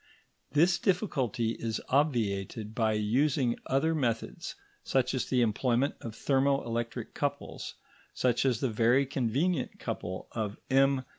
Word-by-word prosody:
This 175 +4 +4
difficulty 135 - 0
is 115 -1 -2
obviated 110 -6 0
by 110 -2 +1
using 120 +4 +1
other 160 +5 +2
methods, 120 -7 -2 0.3
such 130 -1 +1
as 130 - -1
the 125 -1 +2
employment 120 +4 +1
of 115 -2 -6
thermo 135 +2 +2
electric 115 0 -3
couples, - - -3 0.4
such 125 -2 +1
as 130 -5 +1
the 130 - +1
very 120 +5 +3
convenient 135 +4 0
couple 95 +1 -4
of 105 -3 -3
M. 135 0 +4
125 Hz, 130 wpm, -30 LUFS, 115-140 Hz, 0.4 s, This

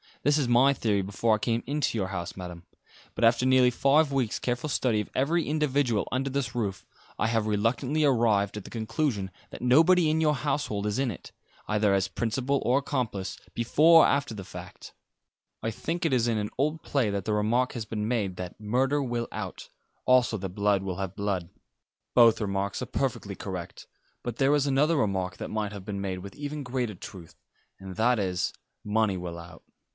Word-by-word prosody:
This 145 +1 +3
was 140 -5 +1
my 125 +3 +5
theory 105 -6 0
before 110 +3 +1
I - - -4
came 115 +1 0
into 145 -4 0
your 95 -3 -1
house, 90 -3 -5
Madam; 90 -2 -8 0.5
but - - -2
after 115 +2 +4
nearly 130 -1 +5
five 140 +4 +3
weeks' 130 -5 0
careful 125 +4 -2
study 125 -5 +1
of - - -8
every 160 +6 +1
individual 140 -7 +1
under 135 +2 -1
this 130 -4 -2
roof, 100 -7 -3 0.3
I - - +2
have 115 -1 0
reluctantly 125 +8 +1
arrived 110 -7 +2
at 105 - -6
the - - -10
conclusion 110 -3 -2 0.2
that - - -9
nobody 160 +6 +5
in 160 +1 +1
your 150 -1 +3
household 135 -7 -2
is 105 +4 -1
in 135 -2 +1
it, 95 - -10 0.4
either 105 -1 +2
as 95 -1 +2
principal 130 +4 -1
or 130 +3 +4
accomplice, 115 -9 -3 0.2
before 155 +8 +6
or - - +5
after 140 -4 0
the 100 - -6
fact. - - -10 0.7
I 115 - 0
think 165 +10 -4
it 155 - +2
is 120 -2 +2
in 115 -2 +1
an 105 0 -2
old 150 +4 0
play 130 -7 +1
that 100 -2 -3
the 110 - 0
remark 115 +5 +1
has 115 -3 -4
been 105 -1 -3
made 105 -6 -1
that 90 0 -7
'Murder 130 +7 +1
will 120 -2 -2
out,' - - -6 0.4
also 125 -3 +4
that 95 -1 -4
'Blood 100 +1 +1
will 95 -2 -4
have 95 -1 -4
blood.' 95 -4 -2 0.7
Both 115 -2 +6
remarks 100 -1 -2
are - - -2
perfectly 110 -7 -2
correct; 90 -4 -7 0.4
but 120 -2 -4
there 135 +2 +3
is 145 -1 +2
another 150 +4 +3
remark 95 -6 -1
that - - -6
might 105 -2 -2
have 100 -2 -8
been 100 -2 -4
made 95 -2 -3
with 100 +1 -10
even 145 0 -5
greater 125 -4 -2
truth, 85 -2 -11 0.4
and 95 -1 -8
that 120 +2 +3
is 95 -2 -1 0.3
'Money 105 -2 +1
will 85 -1 -6
out.' 85 -1 -12
115 Hz, 195 wpm, -27 LUFS, 100-135 Hz, 0.7 s, before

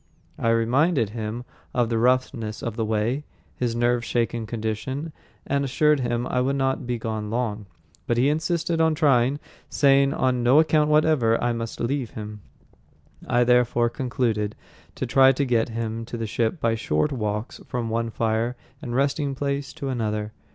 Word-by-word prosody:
I 115 - +1
reminded 115 - +2
him 115 +1 -4 0.3
of 120 -2 +2
the 115 -1 0
roughness 120 -3 0
of 115 -2 -3
the 115 - -1
way, 110 +6 0 0.3
his 120 -2 -1
nerve 120 0 +1
shaken 115 -1 -1
condition, 120 +7 -4 0.3
and 140 0 0
assured 150 +2 +2
him 120 -1 -1
I 125 0 0
would 135 +2 0
not 135 -2 -1
be 120 -1 -1
gone 110 -2 -4
long. 110 -3 -2 0.4
But 120 - +1
he 125 +3 +4
insisted 165 +2 0
on 160 -1 +3
trying, 140 -3 +3 0.3
saying 140 -1 +4
on 130 -1 +1
no 125 +4 +5
account 155 -1 +4
whatever 150 -7 +3 0.2
must 115 -1 -5
I - - -2
leave 130 -1 -1
him. 105 -1 -8 0.9
I 120 0 +3
therefore 120 -1 +3
concluded 115 -5 -1 0.4
to - - -3
try 130 +2 +6
to 140 +2 0
get 120 -2 +1
him 115 0 -3
to 120 - -6
the 115 - -3
ship 115 - -1
by 115 -4 +1
short 110 - 0
walks 105 -3 -3
from 120 -2 -3
one 115 0 -1
fire 115 +2 -1 0.3
and 120 -5 -4
resting 140 +1 0
place 140 0 -2
to 140 - -5
another. 110 -4 -2
120 Hz, 170 wpm, -24 LUFS, 115-135 Hz, 0.9 s, try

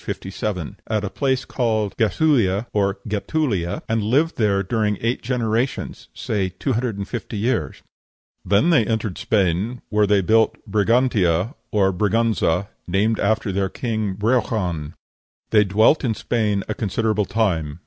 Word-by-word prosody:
57), 95 -3 -4
at 110 -2 -1
a 100 - -3
place 130 -2 0
called 110 -5 -1
Gæthulighe 115 -4 +2
or 100 -1 +1
Getulia, 105 - -1
and 115 0 0
lived 140 +10 +1
there 100 -3 +2
during 105 0 0
eight 115 +2 -1
generations, 120 0 -2
say 100 -4 -2
two 130 +8 -3
hundred 115 -2 -1
and 100 0 -4
fifty 115 -2 -5
years; 115 +4 -1 0.6
"then 105 +13 +3
they 150 -9 +5
entered 110 -4 -2
Spain, 100 +4 0
where 105 -1 +2
they 100 -1 +3
built 110 +3 +3
Brigantia, 105 - +2 0.2
or 95 -4 +2
Briganza, 100 -2 +1 0.2
named 105 +5 +1
after 110 0 +1
their 95 0 0
king 110 -4 -2
Breogan: 100 -8 -1 0.6
they 105 -2 +6
dwelt 105 +10 +3
in 115 -4 0
Spain 105 -5 0
a 110 - -1
considerable 110 0 0
time. 85 -10 -1
105 Hz, 140 wpm, -21 LUFS, 100-115 Hz, 0.6 s, they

